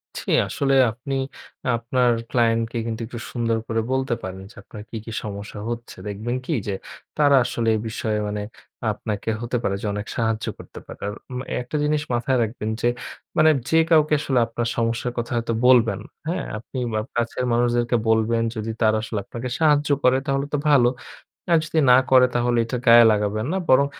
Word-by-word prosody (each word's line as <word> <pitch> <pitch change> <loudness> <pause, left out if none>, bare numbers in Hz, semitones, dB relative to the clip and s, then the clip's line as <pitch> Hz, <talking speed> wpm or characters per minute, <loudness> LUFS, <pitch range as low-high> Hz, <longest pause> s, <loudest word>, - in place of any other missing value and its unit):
জি, - - -6 0.2
আসলে 135 -1 0 0.2
আপনি 130 +4 -5 0.6
আপনার 120 +1 +1 0.2
ক্লায়েন্টকে 115 -1 +1
কিন্তু 115 0 -4
একটু 120 -2 -7
সুন্দর 115 -2 0
করে 115 0 0
বলতে 130 -1 0
পারেন, 95 0 -6
যে - - -20
আপনার 105 - -10
কী, 115 - -5
কী 115 - -7
সমস্যা 100 0 -6
হচ্ছে। 120 0 -6
দেখবেন 110 +5 -3
কি? - - -1
যে 100 - -1 0.4
তারা 145 -2 +5
আসলে 120 -2 -2
এই - - -1
বিষয়ে 110 -1 -2
মানে 105 0 -3 0.5
আপনাকে 105 0 -4
হতে 120 +1 -1
পারে 100 - 0
যে - - -5
অনেক 105 0 -4
সাহায্য 110 -1 0
করতে - - -11
পারে। - - -11
আর 105 - -3 0.2
উম 125 - -4 0.2
একটা 125 +5 -7
জিনিস 150 0 +1
মাথায় 125 +2 +1
রাখবেন 110 -1 -4
যে, 120 - +2 0.5
মানে 155 0 +6 0.2
যে 160 - +4
কাউকে 155 -2 +4
আসলে 135 -4 +1
আপনার 115 0 -3
সমস্যার 115 +1 0
কথা 120 +1 -3
হয়তো 115 0 -1
বলবেন, 115 -6 +5 0.3
হ্যাঁ? 175 +2 -2
আপনি 120 +4 -9 0.2
বা 110 - +1 0.2
কাছের 120 +1 -1
মানুষদেরকে 120 0 +2
বলবেন, 115 +1 +2
যদি 110 +1 -3
তারা 110 0 +4
আসলে 110 -1 -3
আপনাকে 120 +1 -6
সাহায্য 150 -2 +3
করে, 125 +1 +5
তাহলে 135 -1 0
তো 150 - +2
ভালো। 125 -4 +5 0.6
আর 165 - +6
যদি 160 +1 0
না 125 - +8
করে, 130 -1 +7
তাহলে 120 0 +2
এইটা 120 +2 -3
গায়ে 115 0 +9
লাগাবেন 105 +1 0
না 190 - 0
বরং 140 +2 +6
120 Hz, 185 wpm, -23 LUFS, 110-130 Hz, 0.6 s, গায়ে